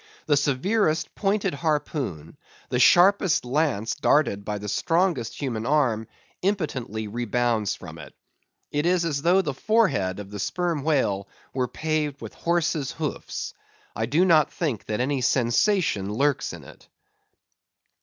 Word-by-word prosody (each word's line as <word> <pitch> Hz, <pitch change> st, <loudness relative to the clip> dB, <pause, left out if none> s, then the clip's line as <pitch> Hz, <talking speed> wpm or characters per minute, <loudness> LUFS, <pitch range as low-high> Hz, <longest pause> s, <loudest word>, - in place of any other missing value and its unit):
The 145 Hz, -, +3 dB
severest 155 Hz, -, +1 dB
pointed 195 Hz, -2 st, 0 dB
harpoon, 140 Hz, -, -2 dB, 0.3 s
the 125 Hz, -, 0 dB
sharpest 180 Hz, +3 st, +5 dB
lance 125 Hz, -5 st, 0 dB
darted 145 Hz, -8 st, +2 dB
by 105 Hz, 0 st, -3 dB
the 105 Hz, 0 st, -7 dB
strongest 165 Hz, -, 0 dB
human 120 Hz, -6 st, -2 dB
arm, 125 Hz, -7 st, +1 dB, 0.3 s
impotently 135 Hz, -, -2 dB
rebounds 120 Hz, -1 st, 0 dB
from -, -, -10 dB
it. -, -, -11 dB, 0.6 s
It 150 Hz, +3 st, 0 dB
is 175 Hz, -1 st, +2 dB
as 145 Hz, -4 st, -1 dB
though 180 Hz, +4 st, +4 dB
the 145 Hz, -, -2 dB
forehead 160 Hz, -, +1 dB
of 100 Hz, -1 st, -8 dB
the 105 Hz, -, -6 dB
Sperm 170 Hz, -, -1 dB
Whale 130 Hz, -10 st, 0 dB, 0.3 s
were 125 Hz, -1 st, 0 dB
paved 155 Hz, -1 st, -2 dB
with 115 Hz, -, -8 dB
horses' 165 Hz, -5 st, -1 dB
hoofs. -, -, -4 dB, 0.4 s
I 110 Hz, +1 st, -1 dB
do 160 Hz, +9 st, +3 dB
not 160 Hz, -5 st, +4 dB
think 140 Hz, -, -3 dB
that 105 Hz, +1 st, -2 dB
any 135 Hz, +1 st, 0 dB
sensation 125 Hz, -, +1 dB
lurks 140 Hz, +5 st, 0 dB
in -, -, -10 dB
it. -, -, -15 dB
140 Hz, 140 wpm, -25 LUFS, 115-165 Hz, 0.6 s, sharpest